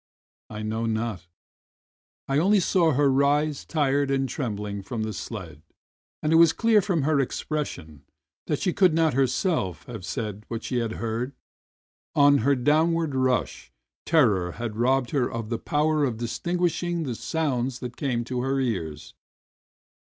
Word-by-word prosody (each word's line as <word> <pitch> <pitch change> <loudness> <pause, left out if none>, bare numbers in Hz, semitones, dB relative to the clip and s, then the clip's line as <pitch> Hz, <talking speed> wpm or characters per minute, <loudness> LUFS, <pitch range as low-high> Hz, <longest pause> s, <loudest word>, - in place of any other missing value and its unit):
I 105 0 -6
know 110 +2 -2
not 110 -6 -3 0.5
— - - -94
I 135 +1 +2
only 200 +5 +4
saw 170 -3 +3
her 145 +2 +3
rise 145 +2 +2
tired 145 -3 +1
and 135 -1 +1
trembling 105 -7 -4
from 110 +3 -4
the 110 0 -3
sled, 95 -8 -7 0.6
and 155 +1 +2
it - - +6
was 165 -1 +6
clear 225 +2 +4
from 175 -6 0
her 150 0 +2
expression 130 - -3 0.5
that - - 0
she 180 - -1
could 180 -5 +4
not 160 -3 +3
herself 125 - 0
have 115 -6 -8
said 105 -1 -4
what 115 -1 -5
she 125 - -2
had 115 -2 -2
heard; 115 +4 -3 0.8
on 145 0 +6
her 140 +5 +3
downward 155 +4 +2
rush 130 -1 -1 0.4
terror 105 - +3
had 115 -1 -5
robbed 125 +2 +1
her 135 -5 0
of 115 -2 -5
the 115 - -2
power 150 0 +1
of 125 -5 0
distinguishing 175 +7 -1
the 130 -5 -3
sounds 125 0 -2
that 125 -2 -7
came 125 -4 -1
to 125 +1 -3
her 135 +1 0
ears. 85 - -3
130 Hz, 160 wpm, -25 LUFS, 115-155 Hz, 0.8 s, it